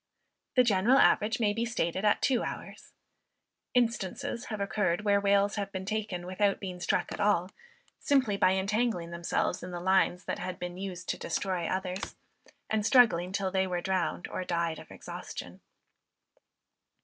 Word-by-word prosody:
The 250 - +6
general 225 +3 +4
average 220 -1 +4
may 210 -3 +2
be 230 +2 -1
stated 190 -5 -1
at 210 - +2
two 255 -4 +3
hours. - - -7 0.8
Instances 235 -1 0
have 215 -2 -5
occurred 200 -2 0
where 200 -1 +3
whales 200 +1 +2
have 200 -1 -3
been 190 -1 -5
taken 205 -4 -3
without 195 +2 +1
being 185 -2 -6
struck 175 - 0
at - - -5
all, 200 -3 +2 0.5
simply 265 -8 +2
by 185 -1 +4
entangling 195 -2 0
themselves 170 +1 -1
in 180 - -7
the 175 -1 -5
lines 185 0 +2
that - - -3
had 185 0 -4
been 180 0 -6
used 185 -2 -6
to - - -2
destroy 185 -4 -2
others, 185 0 -3 0.5
and 220 -1 0
struggling 215 -7 +4
till 195 -1 -1
they 190 0 +1
were 180 -1 -1
drowned 185 -1 -1
or - - -3
died 170 -2 -1
of - - -13
exhaustion. - - -8
195 Hz, 160 wpm, -30 LUFS, 180-210 Hz, 0.8 s, The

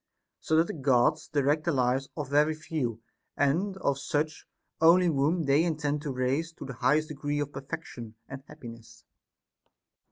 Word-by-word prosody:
So 160 - 0
that 165 +1 +5
the - - -5
Gods 130 -5 +2
direct 145 +1 +1
the 170 - +2
lives 130 0 0
of 145 -3 -4
very 150 +2 +3
few, 125 -8 -4 0.3
and 175 +8 +1
of 140 -7 -1
such 150 +2 -2 0.3
only 170 +3 +6
whom 160 +2 +1
they 140 +2 +3
intend 150 -3 -1
to 150 -2 -4
raise 130 +6 -1
to - - -9
the 135 - -6
highest 155 +6 +1
degree 145 0 -3
of 145 0 -3
per 135 - -6
fection 135 -7 -8
and 135 0 -8
happiness. 115 -6 -12
145 Hz, 165 wpm, -28 LUFS, 135-155 Hz, 0.3 s, only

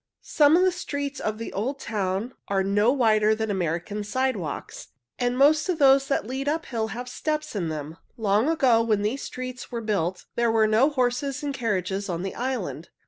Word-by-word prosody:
Some 300 +1 +4
of 365 - +4
the 370 - +4
streets 285 -5 -4
of 215 0 -2
the 230 - -6
little 200 +3 -2
old 275 +2 -3
town 205 +2 -2
are 195 -1 +1
no 205 +4 +3
wider 220 -5 +3
than 220 -1 -2
American 180 +3 -2
sidewalks, 210 - -3 0.3
and 245 0 0
most 300 +5 +4
of 355 - +1
those 275 -2 +5
that 275 - 0
lead 265 +4 -2
uphill 265 -8 -2
have 240 +4 -6
steps 305 +2 -3
in 175 -5 -1
them. 155 +1 -6 0.2
Long 215 +4 +2
ago, 260 -8 +4
when 215 -3 +1
these 235 +7 -1
streets 255 -1 -7
were 235 - -3
built, 190 -5 -2
there 235 0 +2
were 220 -1 +4
no 220 +6 +4
horses 270 +1 -1
and 285 -1 -2
carriages 200 -5 -2
on 175 0 -2
the 195 - -4
island. 235 - -4
230 Hz, 195 wpm, -25 LUFS, 205-275 Hz, 0.3 s, those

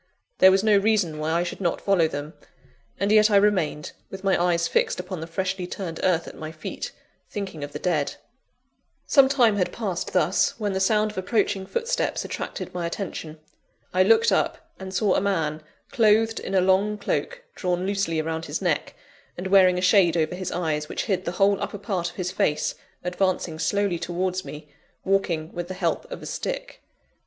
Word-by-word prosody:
There 190 - +9
was 190 +1 +3
no 215 -1 +5
reason 200 -7 +1
why 155 +1 -1
I 170 +1 +2
should 175 - -6
not 175 -3 0
follow 190 -5 +3
them; 145 0 -6 0.7
and 200 +2 +1
yet 215 0 +6
I 205 - +3
remained, 190 -7 +2 0.2
with 190 0 -8
my 195 -1 +3
eyes 170 -1 +2
fixed - - +1
upon 180 -2 -5
the 160 - -5
freshly 185 +1 -2
turned 175 -3 -5
earth 170 -3 +1
at - - -8
my 155 0 -7
feet, 155 -1 -6 0.4
thinking 190 -7 -5
of 145 - -6
the - - -5
dead. 155 -6 -1 0.9
Some 275 -2 +5
time 240 -7 +4
had 180 - 0
passed 195 -7 -3
thus, 180 +1 +2
when 205 -2 -1
the 190 - -1
sound 210 +2 +2
of 210 - -5
approaching 195 -1 0
footsteps 475 +1 -1
attracted - - -5
my 175 -2 -2
attention. 165 -4 -6 0.5
I - - +3
looked 460 0 +5
up, - - -1
and 190 0 -7
saw 195 0 +2
a - - +2
man, 160 -6 -1 0.3
clothed 225 -1 +3
in 195 - -4
a 185 - +5
long 195 +3 +2
cloak 485 - -2
drawn 180 -1 -1
loosely 195 -5 0
around 160 +1 -3
his - - -3
neck, - - -1 0.4
and 180 - -5
wearing 190 -1 +5
a - - -1
shade 180 -2 +4
over 160 +1 +1
his 185 0 -4
eyes, 155 -3 -2
which - - -3
hid 190 -4 -1
the 175 - -2
whole 200 +1 +2
upper - - -3
part 190 -4 -2
of 175 - -15
his 180 -1 -3
face, 150 -4 0 0.3
advancing 180 -2 -1
slowly 200 -1 0
towards 185 +2 -2
me, 150 -3 -9 0.4
walking 175 -5 0
with 175 -1 -4
the 185 - -6
help 185 - -2
of - - -7
a - - -7
stick. - - -5
185 Hz, 195 wpm, -25 LUFS, 170-205 Hz, 0.9 s, There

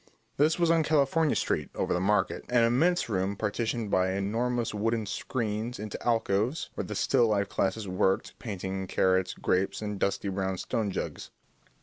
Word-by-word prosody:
This 155 +3 +3
was 170 -1 +3
on 165 -1 +4
California 155 0 +2
Street - - -1
over - - 0
the - - +1
Market, 100 +2 +1
an 120 -1 +4
immense 160 +10 +3
room 100 -2 -1
partitioned 110 +1 -2
by 95 0 +2
enormous 115 +5 -1
wooden 110 +1 0
screens 110 +2 -3
into 105 -1 -6
alcoves, 115 +4 0
where - - -4
the - - -5
still 125 -4 +3
life 100 -2 +1
classes 100 +2 -1
worked, 95 +1 0
painting 95 -3 -4
carrots, 95 0 +1
grapes, 95 +1 0
and 105 -2 -4
dusty 100 +1 0
brown 95 -1 -2
stone 105 +3 -2
jugs. 95 - -4
105 Hz, 160 wpm, -28 LUFS, 95-120 Hz, -, on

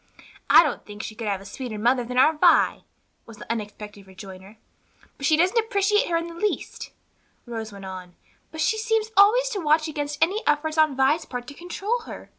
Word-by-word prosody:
"I - - +8
don't 300 - -3
think 210 +1 -9
she - - -6
could 220 0 -6
have 195 -2 -2
a - - -13
sweeter 230 +2 -7
mother 245 +4 +1
than 250 +1 -6
our 285 +5 +5
Vi," 300 - +3 0.4
was 225 -2 -12
the - - -7
unexpected 210 -2 -7
rejoinder. 190 +2 -12 0.6
"But 275 - -2
she 310 - +4
doesn't 370 +8 +3
appreciate 420 -2 +1
her 335 - +1
in 335 - -3
the 340 - -9
least," 410 +5 -3 0.6
Rose 225 -3 -6
went 200 -1 -10
on, 185 -2 -9 0.4
"but 315 - -6
seems 445 0 0
always 450 +4 +4
on 395 - -2
the - - -8
watch 310 +1 +3
against 290 -1 -4
any 390 +7 +1
effort 300 +1 +1
on 310 -4 +3
Vi's 270 +5 +2
part 245 -1 -6
to - - -10
control 390 +9 -3
her." - - -10
290 Hz, 205 wpm, -24 LUFS, 215-355 Hz, 0.6 s, I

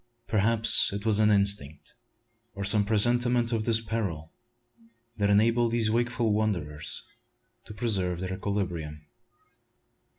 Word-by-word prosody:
Perhaps 110 +1 +3
it 100 +2 -6
was 110 -2 +1
an 105 0 +3
instinct 100 -8 -1 0.6
or 100 - -5
some 105 +1 +2
presentiment 120 +3 +2
of 110 -2 -2
this 115 -1 +3
peril 100 -9 -5 0.8
that 100 -1 0
enabled 115 +3 +2
these 115 -2 +2
wakeful 120 -1 0
wanderers 85 -8 -3 0.6
to - - -10
preserve 95 -6 -2
their 95 0 -4
equilibrium. 85 -7 -4
105 Hz, 120 wpm, -27 LUFS, 95-115 Hz, 0.8 s, Perhaps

